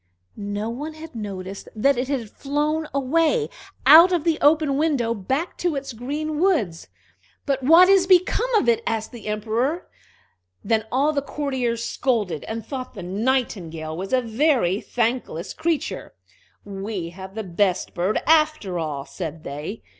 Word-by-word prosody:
No 205 +1 -4
one 300 +6 -6
had 320 +1 -10
noticed 195 -3 -6
that 275 +6 +3
it 250 +1 -2
had 250 -6 -3
flown 300 +2 -1
away, 330 - +1 0.3
out 325 +6 +9
of 345 -4 +1
the 330 -2 +1
open 295 -1 +4
window, 275 -6 +1
back 265 - -3
to 350 -4 0
its 275 -2 -4
green 295 +6 -3
woods. 275 - +1 0.6
"But 275 -1 0
what 330 +7 +7
is 385 -1 +5
become 375 +7 +3
of 420 - +3
it?" 235 -1 +3
asked 220 -1 -2
the 230 -3 -10
Emperor. 230 +10 -1 0.8
Then 220 -2 +1
all 285 +4 +2
the 280 - 0
courtiers 260 -5 -2
scolded, 215 - -1
and 225 0 -5
thought 255 -3 -6
the 190 - -7
Nightingale 185 -7 -2
was 190 +3 -5
a 260 -1 +3
very 230 - +1
thankless 235 -8 -2
creature. 320 -2 -2 0.5
"We 195 -3 -5
have 190 +2 -10
the 220 - -3
best 185 0 0
bird, 180 +4 0
after 305 - +2
all," 145 -4 -3
said 155 +2 -6
they. 150 +10 -6
245 Hz, 155 wpm, -23 LUFS, 200-300 Hz, 0.8 s, out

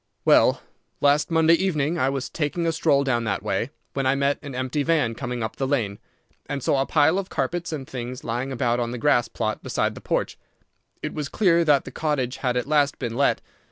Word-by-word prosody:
"Well, - - +5 0.4
last 145 +1 +3
Monday 165 0 +4
evening 170 -3 +1
I 130 - +2
was 135 -1 -3
taking 165 +2 -2
a 165 - +2
stroll 155 -3 +2
down 120 -4 0
that 100 -2 -2
way, 105 +3 -1 0.2
when 135 -1 0
I 135 - +3
met 140 +1 +1
an 140 -3 -8
empty 130 +3 -1
van 145 -6 +1
coming 120 0 -4
up 110 - -5
the 135 -2 -1
lane, 110 -8 -1 0.5
and 140 -2 -4
saw 135 - +2
a 135 - -1
pile 160 +4 +3
of 195 - -5
carpets 175 -1 -2
and 140 -4 -5
things 125 0 -6
lying 120 +4 -3
about 120 -2 0
on 120 -1 -1
the 125 - -4
grass 120 -1 +3
plot 110 -2 -3
beside - - -1
the - - -11
porch. - - -2 0.6
It - - -3
was 150 -2 -4
clear 170 -4 +3
that 145 -3 +4
the - - -8
cottage 135 -5 -1
had 125 -2 -1
at 125 - -1
last 145 -1 +2
been 120 -3 -4
let. 140 +2 +2
140 Hz, 220 wpm, -24 LUFS, 125-150 Hz, 0.6 s, Well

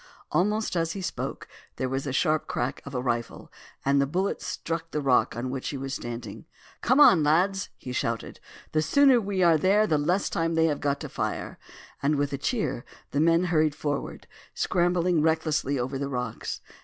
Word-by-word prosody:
Almost 210 +2 +1
as 165 -1 0
he 195 - -5
spoke - - -4 0.3
there 130 - -2
was 135 +2 -3
a - - -1
sharp 155 +3 +1
crack 125 +3 -2
of 140 -1 -8
a 125 - 0
rifle, 120 -2 -3 0.3
and 140 0 +3
the 140 - +1
bullet 185 +7 -1
struck 165 0 -4
the 150 - -2
rock 135 -5 +2
on 125 +2 -3
which 130 -1 -3
he 140 - -4
was 135 0 -5
standing. 120 -3 -6 0.4
"Come 255 +4 +3
on, 185 - +8
lads!" 185 +7 +2
he 125 - -8
shouted, 115 -2 -3 0.3
"the 155 - +2
sooner 270 - +5
we 195 -2 0
are 165 -2 +5
there 200 +5 +4
the 155 -6 +1
less 175 +7 +1
time 165 0 -1
they 160 0 +4
have 150 -3 0
got 140 -1 0
to - - -4
fire;" - - -4 0.4
and 145 +2 +2
with 145 0 -1
a 140 - -2
cheer 145 - -1 0.3
the 140 - 0
men 165 +2 +4
hurried 155 -4 +2
forward, 145 -2 -4 0.3
scrambling 175 -2 +1
recklessly 155 -3 +1
over 130 +2 -2
the 140 0 -2
rocks. 125 -4 -4
155 Hz, 195 wpm, -27 LUFS, 135-175 Hz, 0.4 s, on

